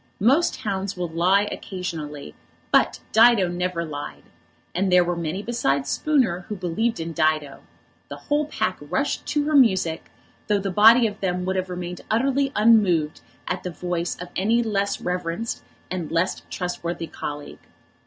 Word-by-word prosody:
Most 270 - +3
hounds 195 -2 -3
will 175 -2 -3
lie 185 +5 +2
occasionally, 155 - -6 0.4
but - - +3
Dido 225 -4 +6
never 175 -1 -2
lied. 145 -2 -7 0.5
And 185 +2 0
there 180 0 +6
were 175 0 -1
many 170 +4 -3
besides 140 - 0
Spooner 260 - +1
who 210 - -3
believed 195 +5 -1
in 165 0 -4
Dido. 155 -3 0 0.5
The - - -6
whole 295 0 -1
pack 215 -10 -2
rushed 180 - -2
to 295 0 +1
her 305 - -1
music, 190 - +3 0.4
though 210 - +3
the 195 -1 -2
body 225 +5 +7
of 210 -1 -3
them 180 -2 -1
would 190 +1 -1
have 185 0 -2
remained 180 0 -5
utterly 270 +4 +1
unmoved 200 -8 +3 0.3
at - - -2
the 180 - -4
voice 175 0 -3
of 180 0 -7
any 225 +5 +2
less 200 -2 -1
reverenced 180 +4 -3 0.3
and 180 -4 -4
less 170 +3 0
trustworthy 175 -2 -4
colleague. 145 -2 -7
185 Hz, 155 wpm, -23 LUFS, 170-220 Hz, 0.5 s, body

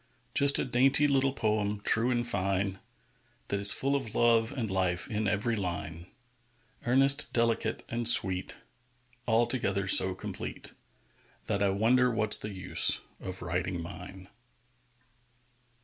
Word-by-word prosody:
Just 140 0 +6
a - - -1
dainty 135 +4 +3
little 135 -1 -2
poem, 105 -4 -4
true 115 +3 0
and 120 -1 -4
fine, 95 -2 -5 0.7
That 100 - -4
is 100 0 +8
full 140 +1 -2
of 115 -6 -7
love 115 0 -1
and 125 -6 -7
life 95 -2 -3
in 105 0 -5
every 105 +3 -4
line, 85 -3 -8 0.8
Earnest, 135 +3 +4
delicate, 115 -1 -3
and 120 -1 -3
sweet, 95 -6 +4 0.7
Altogether 115 -4 -3
so 95 0 +7
complete - - -10 0.7
That 100 -1 -5
I 100 - -1
wonder 120 +6 -1
what's 110 -3 +3
the 105 - -8
use 95 -2 +3 0.2
of 95 -2 -10
writing 90 +1 -6
mine. 90 +2 -12
105 Hz, 130 wpm, -26 LUFS, 95-120 Hz, 0.8 s, is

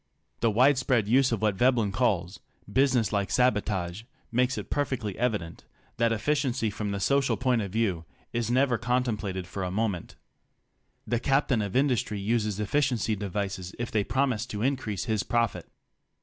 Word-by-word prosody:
The 115 - +2
widespread 125 -1 +3
use 130 +3 +4
of 110 -2 -1
what 105 -2 +2
Veb 125 +5 +3
len 105 -4 +1
calls 95 -5 0 0.3
"business 120 -1 +2
like 100 -1 0
sabotage" 105 -7 +1 0.3
makes 125 +2 +1
it - - -6
perfectly 130 -8 -1
evident 105 -9 -2 0.3
that 115 -1 +2
efficiency 130 -1 0
from 105 0 -4
the 100 0 -2
social 140 +6 +2
point 125 -3 +1
of 100 -3 -4
view 95 -6 0 0.3
is 120 -1 -1
never 125 -1 +2
contem 125 0 +1
plated 95 -3 -4
for 95 +2 -5
a 90 - -2
moment. 100 -2 -2 0.9
The 120 - 0
captain 135 -3 +2
of 100 -2 -4
industry 125 -6 +1
uses 105 -1 0
efficiency 115 -1 +1
devices 95 -2 -4
if 120 0 -4
they 105 -2 +1
promise 125 0 0
to 105 -2 -4
increase 125 -7 -1
his 110 -4 0
profit. 115 -1 -1
115 Hz, 165 wpm, -27 LUFS, 100-125 Hz, 0.9 s, use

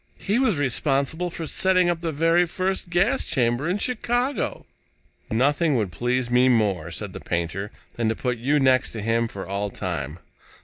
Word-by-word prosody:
"He 205 +5 0
was 225 - +2
responsible 140 +5 0
for 165 -1 -6
setting 185 +2 +3
up 175 -1 0
the 165 -1 -2
very 165 +4 +3
first 185 +1 -2
gas 195 +10 +2
chamber 120 +4 0
in 185 - +1
Chicago." 245 +4 -1 0.6
"Nothing 145 +6 +2
would 105 -6 0
please 120 +7 -1
me 125 +1 +5
more," 100 -8 +1
said 95 +3 -6
the - - -7
painter, 85 +4 -3 0.3
"than 115 -2 +1
to 110 - 0
put 125 -1 -2
you 145 +5 +2
next 130 -2 +3
to 110 - -5
him 115 +1 +1
for 100 -3 -7
all 100 +2 -2
time. 80 -6 -4
130 Hz, 175 wpm, -24 LUFS, 110-175 Hz, 0.6 s, me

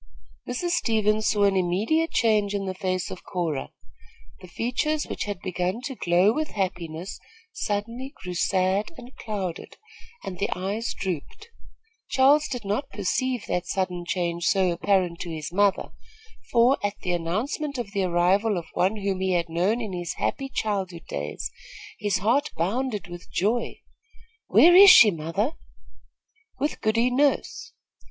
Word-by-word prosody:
Mrs. 345 +8 -2
Stevens 215 -7 +1
saw 205 -2 +2
an 200 -1 +4
immediate 205 - +1
change 210 -3 +2
in 195 -1 -2
the 190 - -3
face 185 -1 -2
of 185 - -8
Cora. 165 -7 -3 0.7
The 185 - -12
features 250 - -1
which - - -4
had 205 -3 -4
begun 185 +3 -2
to 270 +1 -4
glow 180 -1 +3
with 310 +4 -1
happiness 180 -3 -4 0.3
suddenly 230 +6 -3
grew 180 -1 -7
sad 190 - +1
and 245 +1 -12
clouded, 195 -6 -5 0.5
and 180 -2 -6
the 200 - 0
eyes 200 +5 -3
drooped. 190 - -5 0.6
Charles 285 +3 +4
did 245 -7 -5
not 215 +8 -2
perceive 215 +5 -1
that 180 0 -2
sudden 180 -2 -2
change 170 -1 -2
so 190 -1 +3
apparent 180 -1 +1
to 175 - -5
his 160 0 -6
mother, 200 0 +2 0.6
for, 240 +3 +4
at 205 0 -1
the 180 - -2
announcement 215 - -2
of 235 -5 -4
the 200 -1 -1
arrival 185 +4 +2
of 170 - -4
one 190 +4 +1
whom 195 -2 -2
he 190 0 0
had 170 -1 0
known 185 +8 +1
in 215 -4 -5
his 175 -1 -4
happy 270 -1 -2
childhood 190 -8 -3
days, 75 +2 -4 0.5
his 205 -2 0
heart 240 +10 +1
bounded 210 +4 -1
with 175 0 -11
joy. 220 +6 -1 0.7
"Where 350 +1 +7
is 395 +2 +10
she, 220 - +9
mother?" 175 - -2 1.0
"With 295 - -2
Goody 230 +3 +2
Nurse." 285 - 0
200 Hz, 150 wpm, -25 LUFS, 180-235 Hz, 1.0 s, is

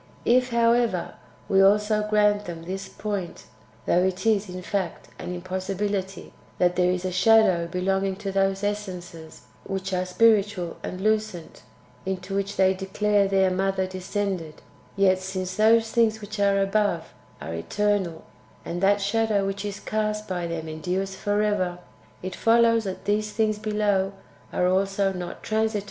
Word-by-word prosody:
If, 250 +1 +3
however, 235 -5 +2 0.3
we 195 0 +4
also 210 +2 +4
grant 210 -1 +3
them 165 -2 -7
this 190 +3 -5
point 200 -5 -5 0.4
(though 180 - +3
it 185 +1 -1
is, 210 -3 +2
in 180 0 -7
fact, 185 -2 -3
an 180 - -5
impossibility), 190 +2 -3 0.2
that 180 0 +2
there 180 0 +3
is 180 0 -2
a 185 - -1
shadow 185 -3 +4
belonging 190 +2 0
to 200 0 -5
those 195 0 +1
essences 180 -6 -5 0.2
which 195 0 -4
are 185 0 0
spiritual 200 -3 +2
and 185 - -6
lucent, 215 -5 -1 0.4
into 190 0 -4
which 200 +1 -2
they 190 0 +4
declare 200 +1 +1
their 190 -1 +3
Mother 190 0 0
descended; 185 -3 -4 0.3
yet, 190 -2 +3
since 185 -1 -4
those 225 +1 +4
things 220 -2 +2
[which 210 0 -7
are 200 -1 +3
above] 195 -3 0 0.3
are 80 - -6
eternal, 190 - -1 0.4
and 175 +1 -4
that 200 +1 +3
shadow 210 0 +1
which 195 +1 -3
is 200 -1 -5
cast 215 0 -2
by 175 -2 -2
them 165 -1 -4
endures 180 +5 -3
for 205 +2 0
ever, 185 -4 0 0.5
[it 185 0 -4
follows 230 -1 +4
that] 190 -1 -5
these 210 +1 0
things 215 -1 +1
[below] 205 -2 0 0.4
are 180 - +1
also 195 +1 +1
not 180 -1 -7
transi 220 0 0
Book - - -4
ii. - - +1
195 Hz, 155 wpm, -25 LUFS, 185-210 Hz, 0.5 s, we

